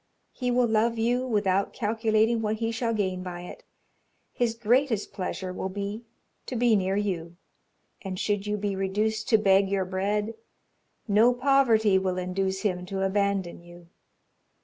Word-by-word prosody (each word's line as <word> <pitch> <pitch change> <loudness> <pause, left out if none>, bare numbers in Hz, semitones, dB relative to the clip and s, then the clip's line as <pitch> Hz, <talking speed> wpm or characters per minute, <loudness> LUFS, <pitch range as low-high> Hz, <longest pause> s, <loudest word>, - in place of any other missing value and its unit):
He 250 -2 -3
will 245 0 +3
love 230 +1 +1
you 245 +3 0
without 200 -4 +1
calculating 225 +1 +1
what 215 0 0
he 225 +1 -2
shall 230 0 -1
gain 190 -4 -1
by 180 -1 -6
it 180 - -10 0.7
his 235 -2 0
greatest 235 0 +1
pleasure 185 -1 -4
will 190 - -4
be 205 +4 -5 0.4
to 255 - -4
be 235 -1 +3
near 190 -1 0
you 175 -5 -3 0.6
and 190 -2 -5
should 205 -1 -1
you 210 0 -1
be 205 -1 -2
reduced 215 +4 -1
to 225 - +6
beg 195 -1 +3
your 195 -1 0
bread, 205 +4 -1 0.7
no 225 +4 +4
poverty 240 -7 +3
will 185 -1 -2
induce 190 +1 -2
him 180 -4 -1
to 195 0 -2
abandon 195 -3 -1
you. 175 0 -15
205 Hz, 155 wpm, -27 LUFS, 190-225 Hz, 0.7 s, to